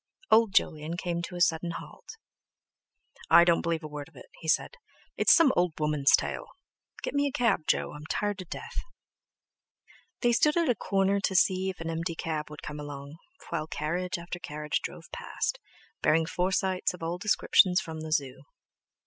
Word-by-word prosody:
Old 220 -3 +5
Jolyon 155 +2 +1
came 175 -1 -2
to 175 +1 -6
a 175 - -4
sudden 170 0 +2
halt. - - -12 1.1
"I 170 +1 +8
don't 170 -1 +3
believe 165 -1 -1
a - - -5
word 150 0 -7
of 160 - -29
it," 125 - -12
he 160 - -9
said, - - +1 0.4
"it's - - +4
some 315 -6 +6
old 175 -2 +2
woman's 150 -2 +4
tale. - - -4 0.6
Get - - -3
me 285 0 +2
a - - -2
cab, 230 -11 +1
Jo, - - +1
I'm 150 +1 -9
tired 205 -1 -1
to 185 - -6
death!" 460 - -6 1.4
They 240 - +3
stood 300 +6 +3
at 335 -4 +2
a - - +5
corner 195 -2 +1
to 195 -1 -1
see 190 +1 +3
if 185 - -6
an 165 0 -3
empty 165 +1 -3
cab 155 -2 -3
would 150 - -10
come 150 0 -6
along, 145 0 -8 0.3
while 155 - -2
carriage 175 +5 -2
after 170 +1 -7
carriage 150 -2 -3
drove - - -7
past, - - -3 0.4
bearing 160 +1 +3
Forsytes 185 +1 0
of 170 - -11
all 170 +2 -3
descriptions 185 -2 +4
from 160 -6 -6
the 160 0 -6
Zoo. 135 -3 -1
170 Hz, 185 wpm, -28 LUFS, 155-190 Hz, 1.4 s, I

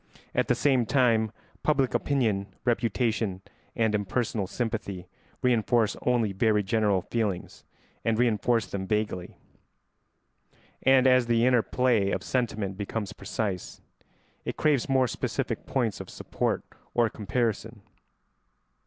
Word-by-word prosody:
At - - +1
the - - +3
same 130 -5 +2
time 115 -5 +3 0.3
public 135 -4 +2
opinion, 110 -9 +1 0.2
reputation, 115 -4 0 0.3
and 110 -2 +1
impersonal 105 0 -1
sympathy 105 -5 -3 0.4
reinforce 120 -2 +2
only 115 -5 +2
very 105 +1 +2
general 100 -2 +1
feelings, 105 -6 -3 0.4
and 115 -1 +1
reinforce 115 -1 +2
them 95 +1 -5
vaguely; 105 -4 -2 1.4
and 135 0 +5
as 130 -2 +5
the 115 0 +3
inner 125 -2 +5
play 120 -5 +2
of - - -2
sentiment 110 -6 -1
becomes 105 0 -4
precise, 100 -5 -4 0.6
it - - -4
craves 145 -4 +2
more 130 -1 +3
specific - - -3
points 115 -7 0
of - - -8
support - - -2 0.3
or 120 -1 +4
comparison. 110 0 -2
115 Hz, 120 wpm, -27 LUFS, 105-125 Hz, 1.4 s, and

